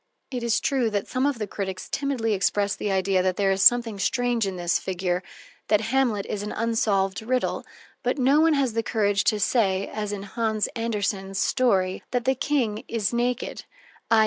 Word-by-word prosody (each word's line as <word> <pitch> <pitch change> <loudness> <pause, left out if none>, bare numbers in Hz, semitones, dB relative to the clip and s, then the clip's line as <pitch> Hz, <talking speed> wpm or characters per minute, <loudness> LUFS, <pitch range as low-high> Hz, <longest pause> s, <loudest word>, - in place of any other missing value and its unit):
It 250 -2 -3
is 235 -1 +1
true 270 -7 +1
that 205 -2 -2
some 255 +2 0
of 285 -3 -1
the 215 - -2
critics 190 -2 -5
timidly 260 -6 -1
express 200 +1 +1
the 205 - -2
idea 190 0 +2
that 185 0 0
there 195 0 +2
is 190 0 0
something 230 0 +5
strange 240 +1 +1
in 190 - -4
this 175 -1 0
figure, 180 -1 -2 0.5
that 210 0 +4
Hamlet 245 -7 +1
is 205 - -4
an 210 - -5
unsolved 210 -4 0
riddle, 250 +3 -1 0.4
but - - -1
no 275 +3 +4
one 325 0 +4
has 270 -5 +1
the 230 - +1
courage 205 -3 +1
to 215 -2 +2
say 200 -3 +2
(as 210 -1 -3
in 200 -1 -5
Hans 220 +1 -1
Andersen's 200 -4 -2
story) 195 -9 +1
that 245 -2 -1
the 265 - +3
King 250 -6 -1
is 225 -1 -1
naked 245 +1 -2 0.4
_i. 225 - +5
215 Hz, 190 wpm, -25 LUFS, 195-245 Hz, 0.5 s, something